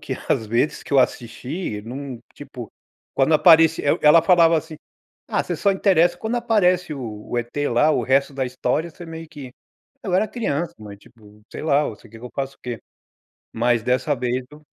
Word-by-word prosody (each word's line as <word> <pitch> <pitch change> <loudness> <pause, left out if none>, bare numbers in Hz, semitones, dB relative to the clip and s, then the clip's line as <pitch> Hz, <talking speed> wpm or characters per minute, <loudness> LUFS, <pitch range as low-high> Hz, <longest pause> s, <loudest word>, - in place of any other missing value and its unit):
que - - -6 0.2
às 110 - +1
vezes 120 +7 0
que - - -10
eu 135 - +5
assisti, 125 - -2
não, 130 +2 -7
tipo, 125 -5 -10 0.4
quando 135 +4 +3
apareci 160 0 +5
eu 145 - +2
ela 150 +2 +7
falava 170 -3 +5
assim: 160 0 -5 0.5
"Ah, - - 0
você - - -4
só 200 -1 +2
interessa 175 -3 +3
quando 220 +6 -3
aparece 185 -8 +1
o 110 -6 -8
o 120 - 0
E.T. 120 +5 -2
lá, 135 +6 +3
o - - +1
resto 135 +2 +1
da 135 -1 -1
história 130 +6 -2
você 175 - -12
meio 165 0 -9
que". 140 -4 -10 0.5
Eu 185 - -1
era 205 +4 +2
criança, 175 - -3
mas 105 -2 -11
tipo, 105 -2 -20
sei - - -7
lá, 150 -1 +2
você 115 -2 -8
quer 115 +1 -13
que 120 - -12
eu 125 - -8
faço 135 0 -4
o - - -63
quê. 120 -2 -5 0.7
Mas 120 0 +1
dessa 125 +5 0
vez 125 0 -2
eu 150 +1 -15
140 Hz, 200 wpm, -22 LUFS, 120-165 Hz, 0.7 s, ela